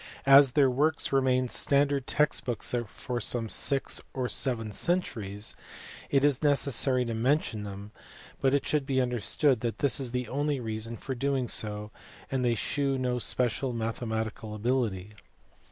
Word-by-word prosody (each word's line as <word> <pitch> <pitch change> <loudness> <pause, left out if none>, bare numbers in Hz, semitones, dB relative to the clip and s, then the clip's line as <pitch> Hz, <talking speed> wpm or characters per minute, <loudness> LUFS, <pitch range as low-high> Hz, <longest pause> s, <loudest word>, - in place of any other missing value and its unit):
As 135 -1 +7
their 145 -3 +4
works 140 +4 0
remained 130 -2 +2
standard 140 -1 +2
text 150 +1 +1
books 120 -2 -1
for 120 +3 -5
some 115 0 -1
six 135 +4 +2
or 130 -2 -1
seven 115 -5 0
centuries 110 - -2 0.5
it 140 -1 +2
is 140 -3 +2
necessary 135 -3 +3
to 115 - -3
mention 120 -1 0
them, 100 +1 -8 0.5
but 135 +1 +3
it 140 - -1
should 145 -3 -1
be 135 -2 +1
understood 125 +2 +1
that 115 0 -3
this 140 -1 +1
is 130 -3 -3
the 125 -1 -3
only 145 +3 -1
reason 115 0 -4
for 135 - -5
doing 135 0 -1
so 105 -1 -3 0.4
and 130 -1 0
they 120 -1 +2
shew 135 +4 -1
no 125 -1 -1
special 125 +2 -1
mathematical 110 -1 -4
ability. 105 -4 -2
125 Hz, 155 wpm, -28 LUFS, 110-140 Hz, 0.5 s, As